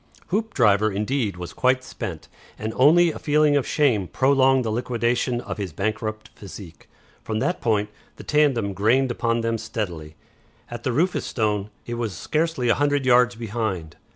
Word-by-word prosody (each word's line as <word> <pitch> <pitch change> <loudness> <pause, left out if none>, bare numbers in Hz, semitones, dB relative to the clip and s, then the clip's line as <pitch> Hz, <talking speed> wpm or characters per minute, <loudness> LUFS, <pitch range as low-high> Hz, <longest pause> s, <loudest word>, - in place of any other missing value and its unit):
Hoopdriver, 115 - +2
indeed, 105 0 -1
was 90 -1 -7
quite 130 0 +2
spent, 110 -10 -7 0.3
and 110 +1 -4
only 165 +6 +5
a - - -8
feeling 150 0 +3
of 140 - +1
shame 120 - +2
prolonged 135 - +3
the 110 - -1
liquidation 120 +1 0
of 120 - -6
his 95 -4 -3
bankrupt 110 +3 -3
physique. 95 -4 -12 0.3
From 110 - -3
that 180 +11 -1
point 105 -3 +1 0.3
the - - -11
tandem 135 -9 +2
grained 120 +7 +2
upon 115 -1 0
them 115 0 -1
steadily. 90 -9 -5 0.6
At 120 -1 -6
the 130 - -1
Rufus 170 +9 0
Stone, 105 -3 -1 0.2
it 120 - -5
was 110 -7 -3
scarcely 155 - -1
a 115 - +5
hundred 145 -2 +1
yards 125 -1 +4
behind. 110 -8 -4
115 Hz, 160 wpm, -23 LUFS, 105-135 Hz, 0.6 s, only